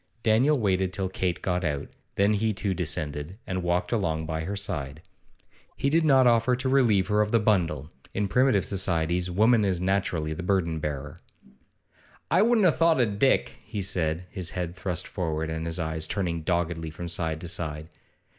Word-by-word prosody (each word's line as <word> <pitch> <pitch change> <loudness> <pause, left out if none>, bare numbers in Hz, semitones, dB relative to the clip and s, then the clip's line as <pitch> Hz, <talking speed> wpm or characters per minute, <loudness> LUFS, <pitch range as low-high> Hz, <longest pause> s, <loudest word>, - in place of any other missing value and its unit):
Daniel 125 +7 +4
waited 95 -5 +1
till 95 -1 -2
Kate 90 -2 -2
got 90 -1 0
out, 75 -3 -2 0.3
then 100 +2 +3
he 110 +1 +1
too 100 0 -2
descended, 75 0 -3
and 90 -1 -3
walked 90 0 0
along 80 -8 0
by 80 0 -3
her 100 +3 -3
side. 75 -6 -3 0.7
He 140 - 0
did 165 +2 +3
not 135 -4 +5
offer 120 +1 +4
to 125 +2 -3
relieve 120 -8 +3
her 105 0 +3
of 105 0 0
the 115 - +4
bundle 90 -9 0 0.2
in 100 0 -1
primitive 125 -1 +3
societies 90 -2 0
woman 110 +5 +4
is 95 -3 0
naturally 90 -4 0
the 80 - -6
burden 90 -4 0
bearer. 75 -2 -5 1.1
'I 180 - +5
wouldn't 225 -2 +4
a' 175 - +6
thought 165 +1 +3
it 120 -3 +3
o' - - -4
Dick,' 115 +7 +1
he 105 -4 -5
said, 85 -2 -1
his 90 -4 -3
head 90 -1 -4
thrust 90 -1 -3
forward, 80 -3 -3
and 80 +1 -3
his 85 - -3
eyes 80 -2 -2
turning 85 -4 -2
doggedly 85 -1 -1
from 85 +3 -7
side 80 -2 -2
to 85 - -6
side. 80 -3 -3
90 Hz, 185 wpm, -26 LUFS, 80-105 Hz, 1.1 s, a